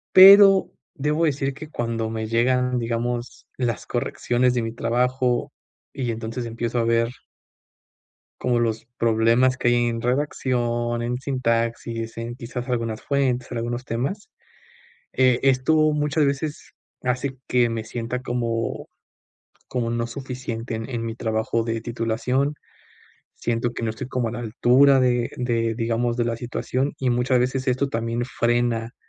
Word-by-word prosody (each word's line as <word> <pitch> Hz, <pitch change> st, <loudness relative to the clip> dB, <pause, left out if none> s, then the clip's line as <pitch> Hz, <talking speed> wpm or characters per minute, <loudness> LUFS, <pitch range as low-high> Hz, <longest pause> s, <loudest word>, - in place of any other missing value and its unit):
Pero 195 Hz, 0 st, +9 dB, 0.2 s
debo 150 Hz, +1 st, 0 dB
decir 140 Hz, -2 st, 0 dB
que 155 Hz, +2 st, -10 dB
cuando 115 Hz, -4 st, -2 dB
me 110 Hz, 0 st, -3 dB
llegan, 125 Hz, +2 st, +2 dB
digamos, 120 Hz, +1 st, -3 dB
las 120 Hz, -4 st, -2 dB
correcciones 125 Hz, +1 st, 0 dB
de 120 Hz, -, 0 dB
mi 115 Hz, -, -3 dB
trabajo, 125 Hz, +2 st, 0 dB, 0.4 s
y 130 Hz, -4 st, -2 dB
entonces 115 Hz, +2 st, -4 dB
empiezo 115 Hz, +1 st, -2 dB
a 115 Hz, -, +1 dB
ver 115 Hz, 0 st, +2 dB, 1.3 s
como 120 Hz, -1 st, +1 dB
los 115 Hz, -1 st, -1 dB
problemas 115 Hz, +3 st, +3 dB
que 120 Hz, -, +2 dB
hay 120 Hz, 0 st, +3 dB
en 115 Hz, -1 st, -2 dB
redacción, 120 Hz, -3 st, 0 dB
en 120 Hz, +1 st, -2 dB
sintaxis, 115 Hz, -3 st, -2 dB
en, 115 Hz, +1 st, -5 dB
quizás, 125 Hz, 0 st, -6 dB
algunas 115 Hz, -3 st, -2 dB
fuentes, 130 Hz, -3 st, 0 dB
en 125 Hz, -, -3 dB
algunos 120 Hz, +2 st, -3 dB
temas. 135 Hz, -, -3 dB, 0.8 s
Eh, 130 Hz, -2 st, +3 dB
esto 135 Hz, +3 st, +3 dB, 0.2 s
muchas 150 Hz, 0 st, +1 dB
veces 140 Hz, +2 st, -3 dB, 0.3 s
hace 130 Hz, +2 st, -2 dB
que 120 Hz, -1 st, +3 dB
me 115 Hz, -1 st, -3 dB
sienta 120 Hz, +2 st, -4 dB
como, 120 Hz, -2 st, -2 dB, 0.8 s
como 120 Hz, -2 st, -1 dB
no 115 Hz, 0 st, -1 dB
suficiente 125 Hz, -2 st, -5 dB
en 110 Hz, 0 st, -5 dB
en 115 Hz, -2 st, -3 dB
mi 115 Hz, -, -4 dB
trabajo 110 Hz, 0 st, -1 dB
de 115 Hz, 0 st, -2 dB
titulación. 120 Hz, +5 st, -1 dB, 0.8 s
Siento 120 Hz, +1 st, -1 dB
que -, -, -5 dB
no 115 Hz, -, 0 dB
estoy 110 Hz, +4 st, -5 dB
como 125 Hz, -3 st, -1 dB
a -, -, -6 dB
la 120 Hz, -, -5 dB
altura 125 Hz, +4 st, +4 dB
de 125 Hz, -2 st, +1 dB
de, 115 Hz, -2 st, 0 dB
digamos, 115 Hz, +1 st, 0 dB
de 120 Hz, -, +1 dB
la 115 Hz, -1 st, -1 dB
situación. 130 Hz, +3 st, -2 dB
Y 130 Hz, -, 0 dB
muchas 125 Hz, +1 st, +2 dB
veces 130 Hz, +2 st, -1 dB
esto 130 Hz, +2 st, +1 dB
también 115 Hz, 0 st, -2 dB
frena 120 Hz, -1 st, 0 dB
120 Hz, 150 wpm, -23 LUFS, 115-130 Hz, 1.3 s, Pero